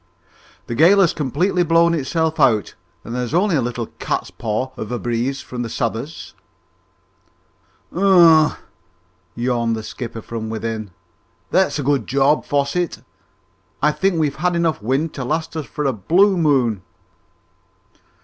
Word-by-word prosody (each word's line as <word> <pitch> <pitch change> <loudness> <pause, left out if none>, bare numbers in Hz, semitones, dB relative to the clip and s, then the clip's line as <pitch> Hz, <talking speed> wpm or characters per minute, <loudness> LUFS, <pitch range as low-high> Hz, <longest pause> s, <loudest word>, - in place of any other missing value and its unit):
"The - - -5
gale 170 +11 +5
has 170 - +3
completely 165 +6 0
blown 170 0 +3
itself 160 +2 -1
out, 110 - +3 0.3
and 115 - -7
there's 125 +4 -2
only 185 0 +2
a 140 - +2
little 120 -1 -3
cat's - - -3
paw 115 +4 -3
of 110 - -6
a 120 - -1
breeze 120 +3 -2
from 125 -1 -6
the 115 - -4
south'ard." 115 +5 -2 1.8
"Humph!" 170 -4 +5 0.8
yawned 120 -1 0
the 110 - -6
skipper 115 -1 -7
from 110 -1 -5
within. 110 -1 -4 0.6
"That's 190 -3 +2
a 145 - -3
good 140 0 0
job, 140 +3 +2
Fosset. 145 +4 -1 0.8
I 150 - +5
think 190 +2 0
we've 150 -4 0
had 175 +3 0
enough 165 -7 0
wind 135 +8 -1
to 135 - -5
last 160 +5 -3
us 155 -5 -4
for 150 +5 -4
a 135 - +1
blue 180 - +3
moon!" 135 - +1
140 Hz, 145 wpm, -20 LUFS, 120-165 Hz, 1.8 s, gale